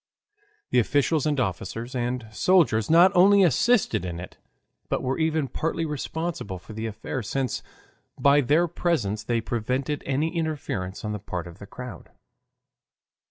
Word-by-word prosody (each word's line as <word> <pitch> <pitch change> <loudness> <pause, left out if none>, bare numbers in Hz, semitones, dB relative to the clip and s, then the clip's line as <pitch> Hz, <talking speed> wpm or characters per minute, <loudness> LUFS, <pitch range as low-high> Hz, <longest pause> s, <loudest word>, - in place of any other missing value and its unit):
The - - +4
officials, 145 +5 +2
and 145 -2 0
officers, 115 +3 -3
and 125 -1 -2
soldiers 115 - +3
not 170 +3 +7
only 195 +2 +6
assisted 180 - +3
in 85 -2 -4
it, 90 - -9 0.5
but - - -1
were 130 +4 -1
even 160 -2 +1
partly 165 +4 -2
responsible 150 - -4
for 100 +5 -12
the 110 +1 -4
affair, 110 +5 -4
since 130 +4 -2 0.6
by 140 +1 +5
their 155 +7 +3
presence 125 - -1
they 115 +1 0
prevented 125 +6 -2
any 150 +5 0
interference 140 - -3
on 105 - -2
the 105 - -4
part 90 -3 -5
of 85 -1 -11
the 100 - -10
crowd. 125 -7 -9
130 Hz, 150 wpm, -25 LUFS, 110-160 Hz, 0.6 s, not